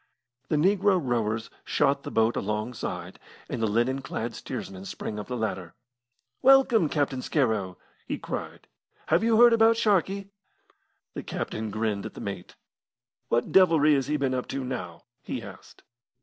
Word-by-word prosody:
The - - +1
negro 190 +4 +3
rowers 115 -5 -1
shot 140 -1 +1
the - - -6
boat 115 +1 +2
alongside, 105 +4 -4 0.3
and - - -4
the 110 - +2
linen 120 +6 +1
clad 115 -3 -4
steersman 95 -3 -7
sprang 105 +1 -5
up 105 - -7
the 125 - -3
ladder. 95 -7 -4 0.7
"Welcome, 260 - +5
Captain 140 -4 -1
Scarrow!" 110 - 0 0.3
he - - -2
cried. - - -6 0.4
"Have 165 +6 +3
you 225 -1 +3
heard 240 -1 +8
about 225 0 +5
Sharkey?" 200 -2 +1 0.8
The - - -5
captain 110 0 -4
grinned 105 -1 -2
at - - -13
the - - -8
mate. 100 -3 -6 0.7
"What 120 - +1
devilry 165 -5 +5
has 135 -3 +1
he 150 +1 0
been 135 -2 0
up 125 -1 -2
to 135 0 -3
now?" 95 -10 -6 0.2
he - - -5
asked. - - -13
130 Hz, 155 wpm, -27 LUFS, 110-180 Hz, 0.8 s, heard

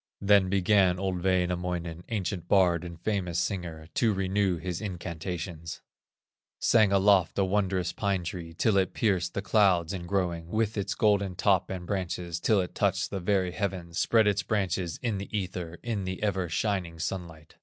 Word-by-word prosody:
Then 100 -2 +4
began 95 -1 +3
old 95 -2 -2
Wainamoinen, 90 -2 -1
Ancient 95 -5 -3
bard 90 -4 +3
and 85 -1 -8
famous 90 -4 -1
singer, 85 -4 -3
To 115 - +2
renew 95 -1 +1
his 85 0 -4
incantations; 85 -4 -5 0.8
Sang 110 -4 +4
aloft 100 -2 +4
a 100 - +3
wondrous 95 -2 0
pine 100 -3 -1
tree, 85 -1 -6
Till 105 +3 +2
it 95 -1 +1
pierced 90 -5 0
the 95 - -2
clouds 95 -4 +3
in 90 -2 -5
growing 85 -3 -1
With 110 +3 0
its 100 -2 -2
golden 100 -3 +2
top 95 0 +2
and 90 -2 -5
branches, 90 -2 -3
Till 105 +1 +3
it 90 - -5
touched - - 0
the 100 - -2
very 95 -1 +1
heavens, 90 -4 -3
Spread 115 -2 +4
its 100 -1 +2
branches 95 -3 -1
in 110 -5 -1
the 100 - -6
ether, 90 -3 -4
In 110 -5 -2
the 95 +2 -4
ever 95 -4 0
shining 90 -2 -1
sunlight. 80 -1 -5
95 Hz, 165 wpm, -28 LUFS, 85-100 Hz, 0.8 s, Then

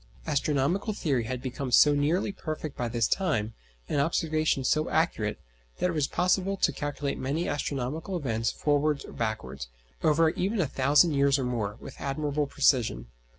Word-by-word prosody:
Astronomical 150 +7 0
theory 135 - 0
had 125 +1 -4
become 130 0 -4
so 145 +4 +7
nearly 150 +8 +1
perfect 155 -5 -5
by 120 - -2
this 115 -1 +1
time, 115 - 0 0.3
and 140 - +1
observations 155 -3 +1
so 155 0 +1
accurate, 135 -10 0 0.4
that 180 - +1
it - - -4
was 150 -3 +1
possible 185 +2 +1
to 155 - +2
calculate 145 0 -3
many 145 +6 -1
astronomical 145 +5 -2
events 115 -7 -1
forwards 150 0 0
or - - -11
backwards, 70 - -4 0.3
over 160 +1 +4
even 195 +6 -1
a 175 - +3
thousand 145 +5 +3
years 140 -1 +3
or 135 - -2
more, 110 -5 -2
with 135 - -10
admirable 145 +1 -1
precision. 110 - +1
145 Hz, 160 wpm, -28 LUFS, 125-160 Hz, 0.4 s, so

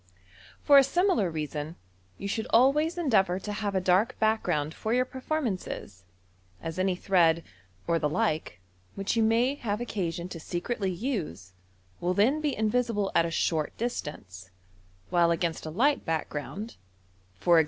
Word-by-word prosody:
For 285 -1 +8
a - - +6
similar 345 - +2
reason, 155 0 -4 0.4
you 200 - -5
should 220 +2 -2
a? 245 +3 +7
way* 305 +3 +1
endeavour 200 - +2
to 205 +2 -5
have 205 -1 -2
a - - +3
dark 190 +7 +2
background 190 -9 +1
for 220 +2 -1
your 255 0 +3
performances, 245 - -4 0.5
as 165 +2 -5
any 185 -1 +2
thread, 170 -3 +3 0.4
or 165 0 +1
the 150 - 0
like, 160 - -1 0.4
which 195 +3 -1
you 230 - +3
m*v 230 +5 +3
have 210 -4 -2
occasion 180 -7 -3
to 170 - -7
secretly 190 +5 -2
use 170 - -4 0.5
will 180 +1 0
then 260 +10 +3
be 295 -3 0
invisible 220 -2 0
at 170 - +3
a - - -3
short 160 -2 -1
distance, 100 - -5 0.6
while 170 -1 +4
against 165 -1 -1
a - - -3
light 265 - +2
background 165 +7 -4 0.3
— 95 0 -34
e*g. 170 -1 +7
190 Hz, 155 wpm, -28 LUFS, 165-235 Hz, 0.6 s, For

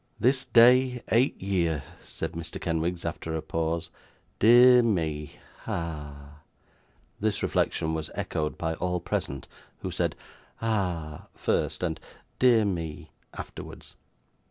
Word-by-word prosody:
'This 130 +2 +3
day 125 +1 +5
eight 120 +5 +3
year,' 85 -7 0 0.2
said - - -5
Mr. 85 0 -6
Kenwigs 85 +1 -2
after 80 0 -3
a 80 - -2
pause. 80 0 -2 0.5
'Dear 125 +3 +8
me 80 -9 -1 0.3
ah!' 75 -3 -5 0.8
This 105 -1 0
reflection 80 0 0
was 80 -1 -3
echoed 75 -1 -2
by 80 -1 -1
all 90 +2 -1
present, 70 -5 -3 0.4
who - - -3
said - - -1 0.4
'Ah!' 90 -9 -2
first, - - -1
and 80 -3 -1 0.4
'dear 120 -4 +5
me,' 80 -5 -4 0.2
afterwards. - - -9
85 Hz, 115 wpm, -27 LUFS, 80-110 Hz, 0.8 s, Dear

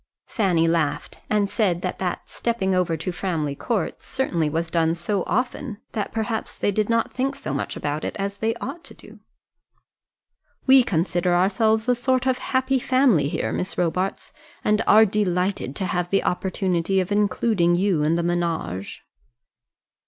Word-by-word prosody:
Fanny 180 -7 +1
laughed 160 -3 -1
and 210 -1 +2
said 190 -5 0
that 185 - -3
that 180 -2 -3
stepping 200 -5 -1
over 180 -3 +1
to 185 +4 -3
Framley 165 -5 -2
Court 200 - -2
certainly 170 -13 -1
was 165 +2 -2
done 165 -1 +2
so 195 +3 -1
often 250 -2 -2
that 210 -3 -3
perhaps 225 0 -3
they - - +1
did 210 +2 0
not 230 0 +1
think 270 +2 -1
so 275 - -5
much - - -3
about 145 +1 -3
it - - -3
as 200 0 -3
they 225 +2 0
ought 285 +8 -6
to - - -10
do. - - -15 1.5
"We 265 0 +7
consider 175 -3 +1
ourselves 220 +5 +2
a 250 - +4
sort 255 +1 0
of 260 -1 +1
happy 260 0 0
family 245 - +3
here, - - -2
Miss 185 - -3
Robarts, 180 +2 -1 0.3
and 210 +1 +2
are 220 +1 +7
delighted 185 -7 -1
to 190 - -2
have 180 -1 -1
the 195 - +2
opportunity 185 0 0
of 185 +1 -2
including 205 -3 +2
you 185 -3 +1
in 155 +2 +2
the 170 - 0
ménage." 170 - -2
190 Hz, 165 wpm, -23 LUFS, 170-225 Hz, 1.5 s, We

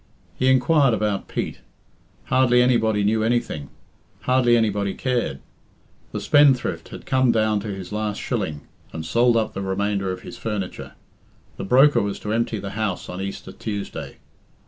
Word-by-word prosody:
He 130 - 0
inquired 130 -1 +4
about 105 -2 -1
Pete. - - -4 0.6
Hardly 125 -1 +3
anybody 110 -4 +2
knew 110 +2 +2
anything; 110 - -1 0.5
hardly 125 -2 +3
anybody 100 -3 0
cared. 125 -2 -1 0.7
The - - -3
spendthrift 145 -3 +3
had - - -10
come 130 -2 +3
down 110 -2 +2
to 100 - -6
his 95 -2 -6
last 105 0 -2
shilling, 95 -11 -3 0.3
and 80 0 -5
sold 115 +7 +3
up 110 -1 0
the 95 - -4
remainder 100 0 -1
of 90 - -6
his - - -10
furniture. 105 -4 -4 0.6
The - - -5
broker 135 +8 +5
was 100 -1 -2
to 105 - -3
empty 115 -1 0
the 100 -1 -6
house 105 -3 -3
on 90 +1 -5
Easter 100 0 -6
Tuesday. 105 -3 -6
110 Hz, 155 wpm, -23 LUFS, 100-125 Hz, 0.7 s, broker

